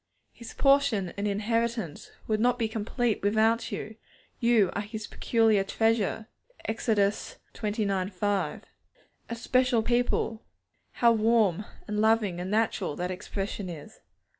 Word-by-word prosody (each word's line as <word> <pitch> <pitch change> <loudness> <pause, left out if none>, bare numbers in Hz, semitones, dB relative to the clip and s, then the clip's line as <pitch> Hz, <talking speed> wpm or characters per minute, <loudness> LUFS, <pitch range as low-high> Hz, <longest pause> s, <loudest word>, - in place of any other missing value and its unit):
His 235 - -11
portion 275 -9 +3
and 200 +1 -2
inheritance 220 -3 -1 0.2
would 215 -1 0
not 245 +2 +3
be 230 -2 0
complete 220 +1 -1
without 220 +3 +2
you; 215 0 -6 0.4
you 230 -6 +3
are 205 - -2
His 215 +1 -6
peculiar 225 -4 +2
treasure 225 +1 0 0.4
(Ex. 220 0 -3
xix. 205 -2 +1 0.7
5); 190 -4 -1 0.7
'a 235 - -3
special 250 0 +2
people' 240 -1 0 0.5
(how 235 -1 +4
warm, 215 -4 +2 0.2
and 210 0 -2
loving, 220 -5 +2
and 180 +1 -4
natural 210 -6 0
that 180 +1 -3
expression 195 +1 -4
is!) 160 -4 -10
220 Hz, 125 wpm, -28 LUFS, 200-230 Hz, 0.7 s, how